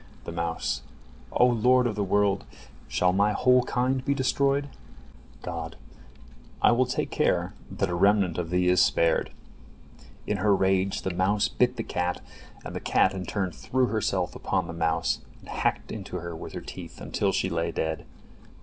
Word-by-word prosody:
The - - -6
mouse: 85 -1 -2 0.5
"O 125 - +4
Lord 125 +1 +4
of 120 - 0
the 105 - 0
world! 100 0 +2 0.4
Shall 90 0 +2
my 100 +2 +3
whole 125 +3 +4
kind 130 +1 0
be 140 - +1
destroyed?" 140 +1 +1 0.8
God: 80 -1 -5 0.8
"I - - +5
will 125 +1 +3
take 125 - -2
care - - +1 0.2
that 100 - -1
a 90 - -3
remnant 95 -1 +3
of 85 -2 -3
thee 90 +1 +1
is 90 0 +5
spared." 85 0 +2 0.9
In - - -1
her 105 -2 +3
rage 95 0 +1
the 95 - -2
mouse 100 +4 +2
bit 125 0 +1
the 115 - -3
cat, 90 -2 -2 0.5
and - - -6
the - - -2
cat 95 - +2
in 95 -2 -5
turn 95 -3 -1
threw 130 +8 0
herself 95 -6 -1
upon 95 -2 -1
the 85 - -6
mouse, 80 -1 0 0.2
and - - -15
hacked - - -1
into 100 -3 -6
her 85 -1 -6
with - - -8
her - - -5
teeth - - -9
until - - -1
she - - 0
lay 85 0 -1
dead. 80 -1 -2
95 Hz, 175 wpm, -27 LUFS, 90-120 Hz, 0.9 s, I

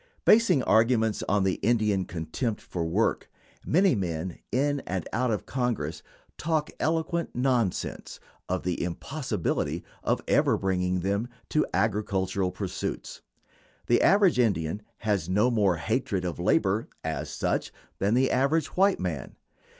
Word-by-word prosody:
Basing 220 - +5
arguments 110 0 +3
on 100 -1 +3
the 95 -1 0
Indian 105 -4 +2
contempt 105 +8 -3
for 85 - -4
work, 80 0 0 0.3
many 185 +3 +3
men 90 -3 -3
in 145 +3 +1
and 90 -2 -3
out 125 +2 +1
of 105 -3 -1
Congress 120 - -2 0.4
talk 155 -1 0
eloquent 165 +2 0
nonsense 125 -6 -1 0.3
of 95 0 -1
the 90 -1 -2
impossibility 125 - -2 0.2
of - - +1
ever - - +3
bringing 90 -1 0
them 100 +5 -1 0.2
to 155 - +2
agricultural 100 -3 0
pursuits. 95 +1 -5 0.6
The 120 - +3
average 195 -7 +4
Indian 100 -5 +1 0.2
has 100 -6 -1
no 105 +7 +3
more 100 -6 +3
hatred 100 -1 -1
of 85 -2 -4
labor, 100 +4 +2 0.2
as 80 0 -3
such, - - -1 0.3
than 100 +4 +2
the 130 +1 +3
average 140 +5 +1
white 195 +1 +3
man. 80 -8 -4
105 Hz, 135 wpm, -27 LUFS, 90-130 Hz, 0.6 s, Basing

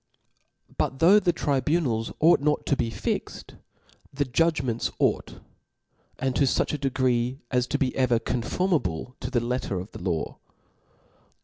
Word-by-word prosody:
But 135 - 0
though 185 +8 +6
the 180 -3 +2
tribunals 140 -6 0
ought 165 +3 +5
not 150 +1 0
to 140 - +2
be 120 -3 -1
fixt, - - -4 0.6
the 145 +1 -1
judgments 130 -3 0
ought; - - 0 0.8
and 130 -1 -1
to 140 - +4
fuch 130 - +1
a 150 - -2
degree 130 -2 0
as 125 -1 +1
to - - 0
be 130 -3 -1
ever 125 -3 +3
conformable 125 - -1
to 125 - -4
the 130 -3 +1
letter 120 -5 -2
of 95 +4 -8
the - - -10
law. 85 -4 -2
130 Hz, 145 wpm, -26 LUFS, 120-150 Hz, 0.8 s, though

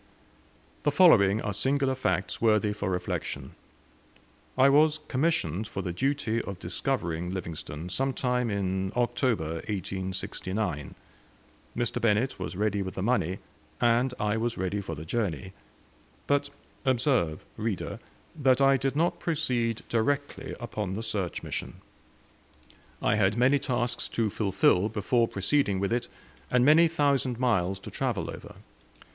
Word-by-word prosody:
The - - +2
following 115 - +5
are 105 - -2
singular 135 +5 +1
facts 95 -8 -1
worthy 110 -2 +3
for 105 -1 -3
reflection. 70 -6 -3 1.1
I 130 +1 +6
was, 150 +2 +4
commissioned 125 - 0
for 95 -3 -5
the 90 - -3
duty 125 0 0
of 100 - -6
discovering 90 -3 -2
Livingstone 85 -3 -5
sometime 125 +2 0
in 95 -2 -1
October, 115 - 0
1869. 95 -3 -3 0.8
Mr. 120 -1 -1
Bennett 115 +4 +1
was - - -4
ready 105 0 0
with 95 -1 -5
the 95 - -3
money, 100 -6 +1 0.4
and 120 +2 +3
I 105 +1 +1
was 115 +1 -1
ready 95 +2 -1
for 80 -4 -5
the 75 +2 -8
journey. 95 - -2 0.7
But, 145 0 +1 0.3
observe, 125 - +1
reader, 105 -3 -3 0.4
that 135 -4 +3
I 135 0 +5
did 135 +1 -1
not 165 +3 +1
proceed 125 -8 -1
directly 140 +5 -1
upon 105 -6 -4
the 110 - -4
search 100 -6 -2
mission. - - -5 1.3
I 105 0 +3
had 100 +1 +2
many 130 +4 +4
tasks 120 -3 -1
to 110 -3 0
fulfil 100 -1 +2
before 115 +3 +1
proceeding 100 0 +1
with 100 +3 0
it, 120 - -1 0.4
and 125 0 +3
many 160 +3 +7
thousand 140 -6 +1
miles 95 -7 +1
to - - -8
travel - - -2
over. - - -10
110 Hz, 135 wpm, -28 LUFS, 95-130 Hz, 1.3 s, many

